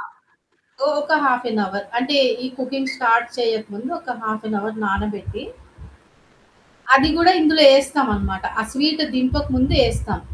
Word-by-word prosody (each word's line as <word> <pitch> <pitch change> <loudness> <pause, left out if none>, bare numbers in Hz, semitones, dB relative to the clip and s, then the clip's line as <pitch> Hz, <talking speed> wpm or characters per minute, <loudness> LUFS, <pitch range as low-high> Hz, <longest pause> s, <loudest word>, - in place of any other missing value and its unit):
ఆ! - - -8 0.8
సో, 275 - -1
ఒక 295 +2 -2
half 250 -2 +1
an 220 -2 -2
hour. 200 +1 -6
అంటే 275 +4 0 0.3
ఈ - - -3
కుకింగ్ 265 0 -4
స్టార్ట్ 235 -1 +2
చేయక 225 -2 -1
ముుందు 225 +6 -8
ఒక 255 -8 -7
హాఫ్ 220 0 -5
ఎన్ 215 - -2
అవర్ 220 +2 -6
నానబెట్టి, 200 0 -4 1.5
అది 275 +3 +3
కూడా 360 +2 +6
ఇందులో 310 -1 +4
ఏస్తామనమాట. 270 -9 0 0.2
ఆ - - -2
స్వీటు 300 +2 +1
దింపక 255 +3 -1
ముుందు 260 +1 +1
ఏస్తాం. - - -5
255 Hz, 150 wpm, -19 LUFS, 220-275 Hz, 1.5 s, కూడా